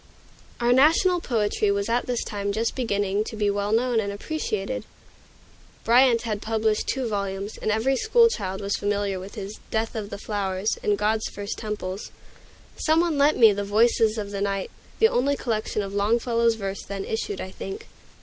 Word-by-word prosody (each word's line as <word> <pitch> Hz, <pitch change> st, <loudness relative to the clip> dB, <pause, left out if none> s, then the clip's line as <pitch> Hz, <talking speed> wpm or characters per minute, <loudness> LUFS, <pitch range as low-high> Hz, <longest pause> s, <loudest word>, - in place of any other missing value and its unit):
Our 240 Hz, 0 st, +3 dB
national 330 Hz, +7 st, +4 dB
poetry 210 Hz, -5 st, 0 dB
was 200 Hz, 0 st, 0 dB
at 235 Hz, +1 st, 0 dB
this 245 Hz, -2 st, -1 dB
time 200 Hz, -1 st, -3 dB
just 220 Hz, +3 st, -1 dB
beginning 205 Hz, -4 st, 0 dB
to 220 Hz, -, -6 dB
be 210 Hz, -1 st, +1 dB
well 200 Hz, +1 st, -1 dB
known 235 Hz, +1 st, +2 dB
and 200 Hz, -2 st, -2 dB
appreciated. 255 Hz, 0 st, -3 dB, 1.0 s
Bryant 240 Hz, 0 st, +5 dB
had 215 Hz, -3 st, -3 dB
published 220 Hz, -1 st, 0 dB
two 265 Hz, -2 st, -1 dB
volumes, 200 Hz, -1 st, -3 dB
and -, -, -2 dB
every 225 Hz, +5 st, +2 dB
school 465 Hz, -, +5 dB
child 195 Hz, -, -3 dB
was 200 Hz, 0 st, -1 dB
familiar 205 Hz, -1 st, -1 dB
with 195 Hz, +4 st, -9 dB
his 205 Hz, -1 st, -7 dB
"Death 220 Hz, 0 st, -1 dB
of 210 Hz, -2 st, -4 dB
the 200 Hz, -, -6 dB
Flowers" 200 Hz, 0 st, -2 dB
and 205 Hz, -1 st, +1 dB
"God's 215 Hz, +1 st, 0 dB
First 205 Hz, +1 st, -6 dB
Temples." 210 Hz, -3 st, -5 dB, 0.7 s
Some 315 Hz, +1 st, +2 dB
one 335 Hz, -4 st, +1 dB
lent 290 Hz, +2 st, +4 dB
me 225 Hz, -3 st, +7 dB
the 205 Hz, 0 st, -2 dB
"Voices 220 Hz, +1 st, +3 dB
of 205 Hz, -2 st, -4 dB
the 200 Hz, -1 st, -4 dB
Night," 195 Hz, -1 st, -2 dB, 0.3 s
the 445 Hz, -, +6 dB
only 280 Hz, -, +1 dB
collection 215 Hz, -3 st, -2 dB
of 195 Hz, 0 st, -6 dB
Longfellow's 230 Hz, +3 st, +2 dB
verse 195 Hz, -2 st, -4 dB
then 195 Hz, -1 st, -5 dB
issued, 210 Hz, -3 st, -3 dB
I 190 Hz, -, -6 dB
think. 195 Hz, 0 st, -7 dB
215 Hz, 180 wpm, -25 LUFS, 200-235 Hz, 1.0 s, me